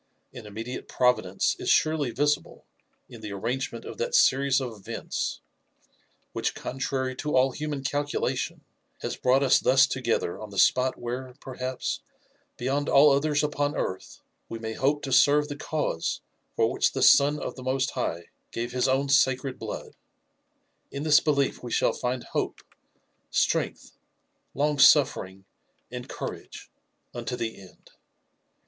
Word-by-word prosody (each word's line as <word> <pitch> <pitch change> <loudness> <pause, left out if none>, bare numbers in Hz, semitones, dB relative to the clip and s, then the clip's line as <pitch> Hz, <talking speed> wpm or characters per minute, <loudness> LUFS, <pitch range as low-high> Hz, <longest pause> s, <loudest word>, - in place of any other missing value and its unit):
An 120 -5 -9
immediate 115 +4 -6
Providence 125 -7 +1
is - - -3
surely 155 -4 +2
visible 145 +5 -1 0.4
in 115 - -12
the 105 -2 -6
arrangement 115 +3 -3
of - - -8
that 480 0 -1
series 135 - +4
of 130 -3 -4
events 100 -3 -4 0.9
which, - - -2
contrary 130 0 -3
to 150 -2 -2
all 130 +1 +4
human 145 0 -4
calculation, 145 +1 -2 0.4
has - - -2
brought 130 +2 +2
us 135 - +5
thus 130 +1 +5
together 125 -9 -2
on 110 - -8
the 100 - -10
spot 130 +6 +3
where, 125 +1 -5
perhaps, 130 -1 -4 0.6
beyond 140 +4 -1
all 145 +1 +7
others 145 +2 +2
upon 145 0 -1
earth, 95 - -4 0.3
we 115 - -5
may 110 0 -5
hope 145 +5 0
to 135 - -4
serve 145 +3 +5
the 145 - -4
cause 145 - -2 0.3
for - - +2
which - - +1
the - - 0
Son 145 +1 +6
of - - -4
the 130 - -9
Most 130 +2 0
High 85 -9 -3 0.2
gave 120 +1 -4
his 125 +1 +1
own 135 +2 +1
sacred 135 -1 +2
blood. - - -6 1.0
In 140 +1 -5
this 155 -1 +6
belief 140 -3 0
we 120 - -7
shall - - +2
find 125 0 -3
hope, - - -3 0.7
Itrength, - - 0 0.6
long 145 0 0
suffering,* 95 -10 +4 0.5
and - - -7
courage, - - -7 0.4
unto 120 +1 -4
the 110 -4 -5
end. 95 - -18
130 Hz, 145 wpm, -26 LUFS, 120-145 Hz, 1.0 s, all